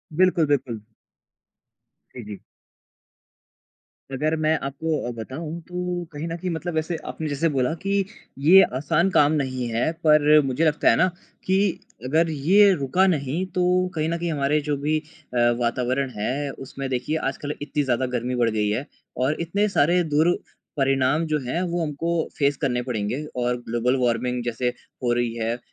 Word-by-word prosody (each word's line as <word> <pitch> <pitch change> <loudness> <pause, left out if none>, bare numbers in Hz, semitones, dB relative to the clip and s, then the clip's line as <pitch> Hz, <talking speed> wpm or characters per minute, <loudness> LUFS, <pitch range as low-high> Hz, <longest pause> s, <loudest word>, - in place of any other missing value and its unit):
बिल्कुल, 180 -3 +4
बिल्कुल। 125 -6 -1 1.3
जी, 120 - -7
जी। 105 -1 -7 1.8
अगर 155 +4 0
मैं 155 +1 +3
आपको 150 +3 -2
अ, - - -2
बताऊँ 155 +8 -6
तो 180 0 -3
कहीं 150 +3 -4
न 165 - -3
कहीं 180 +2 -4
मतलब 170 +1 -4
वैसे 160 +2 -1
आपने 160 - -4
जैसे 150 +4 +1
बोला 130 +4 +1
कि 200 0 +1 0.4
ये 190 +4 +9 0.2
आसान 160 +6 +2
काम 145 -3 +4
नहीं 130 -2 -3
है 115 +7 0
पर 150 0 +6
मुझे 135 +5 0
लगता 150 -1 +3
है 115 - +5
ना 185 - +4 0.4
कि 190 +1 +2 0.5
अगर 160 +5 +2
ये 185 +8 +5
रुका 155 +5 +2
नहीं 155 +1 0
तो 180 - +3 0.3
कहीं 155 +1 0
न 170 - -1
कहीं 170 -1 -2
हमारे 145 +1 +1
जो 145 - 0
भी 150 +3 0
अ, 155 -4 -11 0.2
वातावरण 125 +3 0
है 135 +7 -2 0.2
उसमें 135 +1 -5
देखिए 130 +5 -1
आज 135 -3 -2
कल 145 0 -4
इतनी 145 0 -1
ज़्यादा 130 -1 0
गर्मी 125 +1 -2
बढ़ 120 -2 +2
गई 105 -1 0
है 115 +7 -1 0.4
और 145 +3 +1
इतने 200 +5 +1
सारे 175 +5 +4
दुरपरिणाम 145 -3 +1
जो 150 - +2
हैं 165 +8 -1
वो 170 0 -1
हमको 160 +2 -2 0.2
फ़ेस 140 -2 +2
करने 125 -4 0
पड़ेंगे। 120 +5 -2
और 125 0 0
ग्लोबल 120 +3 +1
वार्मिंग 125 +1 0
जैसे 120 +1 -1 0.3
हो 120 - +2
रही 120 -1 0
है 115 +1 -1
145 Hz, 170 wpm, -24 LUFS, 125-165 Hz, 1.8 s, ये